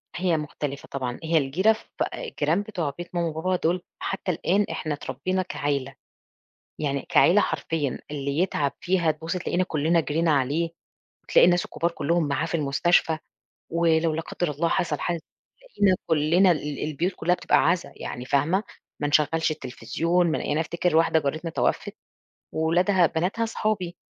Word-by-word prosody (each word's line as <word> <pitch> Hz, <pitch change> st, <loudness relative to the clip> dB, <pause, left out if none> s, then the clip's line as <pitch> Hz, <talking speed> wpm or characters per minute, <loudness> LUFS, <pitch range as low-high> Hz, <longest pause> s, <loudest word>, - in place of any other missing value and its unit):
هي 175 Hz, -2 st, +1 dB
مختلِفة 145 Hz, -2 st, -5 dB
طبعًا، 125 Hz, -3 st, -3 dB
هي 160 Hz, 0 st, +2 dB
الجيرة 170 Hz, +10 st, +3 dB
ف 220 Hz, -, -13 dB, 0.3 s
الجيران 170 Hz, -, -1 dB
بتوع 180 Hz, -8 st, -3 dB
بيت 175 Hz, +1 st, -8 dB
ماما 170 Hz, -1 st, +1 dB
وبابا 165 Hz, +4 st, -1 dB
دول 175 Hz, +1 st, 0 dB, 0.2 s
حتى 195 Hz, -1 st, -2 dB
الآن 190 Hz, +4 st, +1 dB
إحنا 155 Hz, -, -3 dB
اتربينا 145 Hz, +7 st, -2 dB
كعيلة، 140 Hz, -6 st, -2 dB, 0.8 s
يعني 140 Hz, -3 st, -2 dB
كعيلة 195 Hz, +4 st, +5 dB
حرفيًا، 150 Hz, -9 st, -1 dB
اللي 140 Hz, 0 st, -3 dB
يتعَب 150 Hz, -6 st, +1 dB
فيها 180 Hz, -3 st, +2 dB
تبُصّي 160 Hz, +4 st, -3 dB
تلاقينا 180 Hz, +1 st, 0 dB
كلّنا 165 Hz, 0 st, +1 dB
جرينا 160 Hz, +3 st, 0 dB
عليه 145 Hz, +4 st, +1 dB, 0.5 s
وتلاقي -, -, +5 dB
الناس 175 Hz, 0 st, +3 dB
الكُبار 170 Hz, +1 st, -1 dB
كُلّهم 165 Hz, 0 st, 0 dB
معاه 140 Hz, -, 0 dB
في -, -, -2 dB
المستشفى 160 Hz, +2 st, +2 dB, 0.5 s
ولو 165 Hz, -1 st, +2 dB
لا 160 Hz, -, -2 dB
قدّر 175 Hz, -1 st, -3 dB
الله 155 Hz, +4 st, 0 dB
حصَل 150 Hz, -4 st, 0 dB
حاجة 175 Hz, -1 st, -1 dB, 0.4 s
تلاقينا 205 Hz, -, +2 dB
كلّنا، 165 Hz, +4 st, +4 dB
ال 150 Hz, -3 st, -2 dB
البيوت 155 Hz, +5 st, -1 dB
كُلّها 175 Hz, +2 st, +1 dB
بتبقى 180 Hz, -, +2 dB
عزا 170 Hz, -5 st, -1 dB
يعني 125 Hz, -, -6 dB
فاهمة، 155 Hz, +10 st, +1 dB, 0.4 s
ما 145 Hz, -, 0 dB
نشغّلش 155 Hz, +2 st, +2 dB
التليفزيون 165 Hz, +6 st, 0 dB
ما -, -, 0 dB
يعني 150 Hz, -, -1 dB
أفتكِر 170 Hz, +1 st, 0 dB
واحدة 165 Hz, 0 st, +4 dB
جارتنا 155 Hz, +3 st, -3 dB
توفِّت -, -, -1 dB, 0.6 s
وولادها 175 Hz, +3 st, +3 dB
بناتها 185 Hz, +9 st, -1 dB
صحابي، 205 Hz, -6 st, -2 dB
165 Hz, 155 wpm, -25 LUFS, 150-180 Hz, 0.8 s, كعيلة